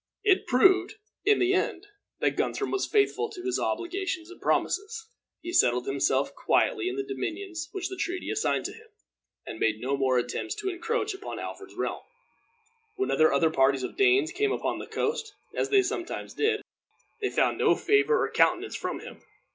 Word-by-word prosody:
It 395 -3 +3
proved, 370 +9 +4 0.3
in 425 +1 +5
the 365 +1 +2
end, 390 -1 -1 0.4
that - - +2
Guthrum 410 - -1
was 385 - 0
faithful 430 +1 +2
to 375 -4 -9
his 375 0 0
obligations 360 -1 -2
and 360 - -13
promises. 425 +3 0 0.4
He 345 +1 -5
settled 125 - +3
himself 135 0 +1
quietly 415 -7 +1
in 375 - -4
the 405 - -2
dominions 385 -4 -5
which 380 -3 -3
the 380 - -6
treaty 365 0 -3
assigned 430 +1 0
to - - -4
him, 450 0 -15 0.6
and 110 - -7
made 110 -1 +1
no 130 +4 -1
more 130 -2 +2
attempts 120 0 -2
to 410 -3 -3
encroach 430 +4 -2
upon 385 +2 -7
Alfred's - - -8
realm. - - -3 0.9
Whenever 270 - +3
other 150 +3 +3
parties 135 -2 +3
of - - -5
Danes 385 -4 +4
came 410 +3 0
upon - - -2
the - - -7
coast, 445 -2 -2 0.2
as - - -1
they 400 -1 +5
sometimes 370 -2 -4
did, 435 0 +1 0.6
they 405 - +1
found - - +1
no - - +4
favor 440 +3 +3
or - - -6
countenance - - +2
from - - -4
him. - - -11
380 Hz, 180 wpm, -27 LUFS, 325-415 Hz, 0.9 s, in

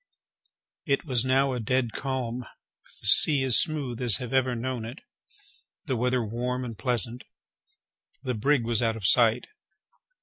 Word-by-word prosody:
It 140 +3 0
was 125 -5 +1
now 135 +1 +2
a 125 - -3
dead 120 +1 0
calm, 130 -3 -3
with 125 - -16
the - - -12
sea 145 -3 +4
as 130 -3 +4
smooth 140 -7 -2
as 120 -5 +3
I - - -5
have 125 - -6
ever 130 -2 +2
known 120 0 -4
it,—the 165 - -10
weather 125 0 0
warm 125 +3 -3
and 115 -2 -6
pleasant. 120 0 -2 1.0
The 130 -2 -2
brig 130 +3 +1
was 115 -1 +1
out 115 -1 +1
of 110 -4 -6
sight. 115 +3 +5
125 Hz, 160 wpm, -26 LUFS, 115-130 Hz, 1.0 s, sight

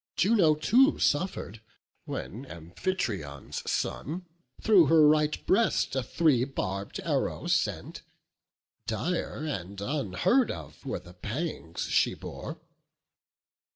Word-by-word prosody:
Juno 185 -6 +4
too 250 - +4
suffer'd, 145 - 0 0.4
when 125 +7 -6
Amphitryon's 85 - -4
son 175 +6 -2 0.3
Through 195 -8 +6
her 155 0 +6
right 150 0 +2
breast 220 - +2
a 135 - +1
three 135 -1 +2
barb'd 100 -7 -4
arrow - - -1
sent: - - -1 0.9
Dire, 150 - -2
and 100 - -4
unheard 140 - +1
of, - - -8
were - - -1
the 90 0 -13
pangs 105 - -4
she - - +2
bore. - - -7
140 Hz, 105 wpm, -28 LUFS, -, 0.9 s, Through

